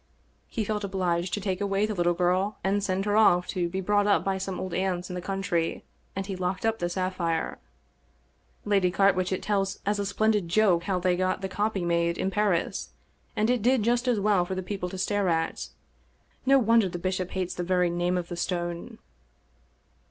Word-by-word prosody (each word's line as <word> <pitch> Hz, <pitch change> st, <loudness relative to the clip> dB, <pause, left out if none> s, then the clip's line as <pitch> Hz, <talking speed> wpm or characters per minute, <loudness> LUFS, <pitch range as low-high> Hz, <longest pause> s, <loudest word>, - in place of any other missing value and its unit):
He 225 Hz, -, -2 dB
felt 210 Hz, 0 st, -2 dB
obliged 180 Hz, -2 st, -1 dB
to -, -, -4 dB
take 190 Hz, -1 st, -2 dB
away 200 Hz, +1 st, +1 dB
the 215 Hz, -, -2 dB
little 175 Hz, -2 st, +1 dB
girl, 185 Hz, +4 st, +1 dB
and 200 Hz, +1 st, +1 dB
send 195 Hz, 0 st, -1 dB
her 205 Hz, 0 st, +1 dB
off 180 Hz, -5 st, +5 dB
to 175 Hz, -2 st, -1 dB
be 190 Hz, +2 st, -3 dB
brought 205 Hz, +2 st, +2 dB
up 200 Hz, -, +3 dB
by 195 Hz, -1 st, -1 dB
some 190 Hz, -1 st, -4 dB
old 185 Hz, -2 st, -4 dB
aunts 185 Hz, -1 st, -1 dB
in -, -, -4 dB
the 180 Hz, -, -4 dB
country, 195 Hz, -3 st, -2 dB, 0.3 s
and 195 Hz, 0 st, -3 dB
he 195 Hz, -1 st, -4 dB
locked 185 Hz, +3 st, -2 dB
up 225 Hz, 0 st, +1 dB
the 175 Hz, -, -1 dB
sapphire. 175 Hz, -2 st, -2 dB, 1.1 s
Lady 200 Hz, -3 st, +3 dB
Carwitchet 185 Hz, 0 st, +2 dB
tells 195 Hz, -2 st, 0 dB
as 205 Hz, +1 st, 0 dB
a 200 Hz, -, -1 dB
splendid 210 Hz, -2 st, +1 dB
joke 180 Hz, -3 st, +3 dB
how 195 Hz, -2 st, 0 dB
they 180 Hz, 0 st, +1 dB
got 185 Hz, +1 st, 0 dB
the 190 Hz, -, -2 dB
copy 205 Hz, -1 st, -1 dB
made 170 Hz, 0 st, +1 dB
in 190 Hz, -, -1 dB
Paris, 200 Hz, -4 st, 0 dB, 0.5 s
and 215 Hz, +3 st, +2 dB
it 250 Hz, -3 st, +1 dB
did 245 Hz, 0 st, +3 dB
just 240 Hz, +3 st, +1 dB
as 240 Hz, -4 st, +2 dB
well 200 Hz, -3 st, +3 dB
for 185 Hz, +2 st, -4 dB
the 185 Hz, -, -3 dB
people 185 Hz, -1 st, -4 dB
to 190 Hz, -, -7 dB
stare 200 Hz, 0 st, 0 dB
at. 165 Hz, -1 st, -1 dB, 0.8 s
No 275 Hz, 0 st, +7 dB
wonder 230 Hz, -5 st, +4 dB
the 175 Hz, -, -5 dB
bishop 185 Hz, 0 st, -2 dB
hates 185 Hz, -1 st, -3 dB
the -, -, -4 dB
very 180 Hz, 0 st, +1 dB
name 175 Hz, +1 st, 0 dB
of 175 Hz, -1 st, -3 dB
the 175 Hz, -, -5 dB
stone." 175 Hz, -1 st, -3 dB
190 Hz, 205 wpm, -27 LUFS, 180-205 Hz, 1.1 s, No